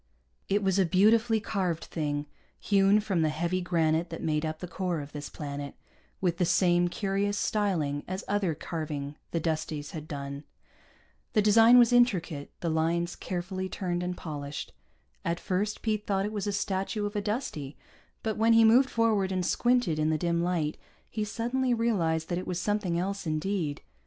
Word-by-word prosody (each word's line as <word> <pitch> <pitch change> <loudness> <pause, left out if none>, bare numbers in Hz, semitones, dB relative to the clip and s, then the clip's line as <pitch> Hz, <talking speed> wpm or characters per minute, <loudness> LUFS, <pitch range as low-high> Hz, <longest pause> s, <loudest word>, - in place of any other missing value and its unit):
It 205 +1 +2
was 190 0 +2
a - - +6
beautifully 220 +5 +4
carved 185 -6 -2
thing, 145 -2 -2 0.3
hewn 200 +1 +4
from 195 -5 0
the 155 - +3
heavy 170 +4 -1
granite 165 -1 +1
that 165 - -6
made 155 -1 0
up 155 0 -4
the 180 - -7
core 180 -2 -2
of 145 0 -8
this 145 -1 -6
planet, 140 -1 -6 0.4
with 175 -3 0
the - - +3
same 175 0 +3
curious 200 +2 -1
styling 170 -11 0
as 185 +2 -4
other 195 -5 0
carving 150 -3 -4
the 165 - -1
Dusties 155 -2 -2
had 155 -1 -7
done. 140 -1 -6 0.9
The 210 - +3
design 225 +3 +7
was 240 -1 +6
intricate, 185 - +2
the 170 - -1
lines 170 +2 0
carefully 185 +1 -4
turned 175 -2 -2
and 180 0 -3
polished. 145 -3 -6 0.5
At 170 0 -1
first 200 +3 -2
Pete 215 -2 -1
thought 195 -1 +1
it 210 - -4
was 205 -1 -2
a - - +1
statue 200 +1 -1
of 205 +1 -4
a 205 - 0
Dustie, 200 - -3 0.5
but 220 -2 -1
when 225 +1 +4
he 225 0 +7
moved 250 +4 +6
forward 215 -4 +2
and 185 -1 0
squinted 240 -11 +2
in 155 0 +2
the 155 - +2
dim 170 +1 0
light, 170 -4 -1 0.3
he 215 - -2
suddenly 240 +4 0
realized 170 -9 +1
that 175 - 0
it 185 - -7
was 180 -1 -2
something 200 -3 0
else 195 +1 -2
indeed. 155 -1 -2
180 Hz, 180 wpm, -29 LUFS, 160-205 Hz, 0.9 s, design